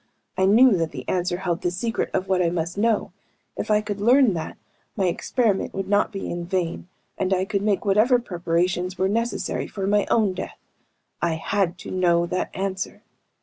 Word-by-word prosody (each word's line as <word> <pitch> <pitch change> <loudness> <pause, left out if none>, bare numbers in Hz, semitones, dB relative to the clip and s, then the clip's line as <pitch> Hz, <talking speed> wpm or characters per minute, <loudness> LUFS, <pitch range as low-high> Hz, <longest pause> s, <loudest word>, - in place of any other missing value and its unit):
I 190 - +2
knew 230 +3 +6
that 165 -1 0
the 130 -4 -8
answer 180 -1 0
held 180 -1 -2
the 175 - +1
secret 225 +6 -2
of 190 0 -1
what 185 -1 +2
I 170 - +2
must 170 0 -2
know. 220 -1 +1 0.4
If - - -4
I 210 0 +4
could 205 -1 -5
learn 245 0 +5
that, 165 -2 -5 0.4
my 195 - +1
experiment 200 +3 0
would 195 -1 -3
not 205 +2 +2
be 195 -2 -5
in 175 0 -4
vain, 175 -1 -2 0.3
and 190 0 0
I 190 0 +2
could 200 -1 -1
make 205 -1 0
whatever 215 +6 +4
preparations 180 -3 -1
were 190 - +2
necessary 230 +4 -1
for 195 -2 -4
my 205 +1 +2
own 215 -5 +3
death. 185 - -6 0.6
I 170 -1 +1
had 180 +1 -1
to - - -6
know 175 -2 +2
that 180 +1 -2
answer. 190 0 -4
190 Hz, 190 wpm, -24 LUFS, 175-205 Hz, 0.6 s, knew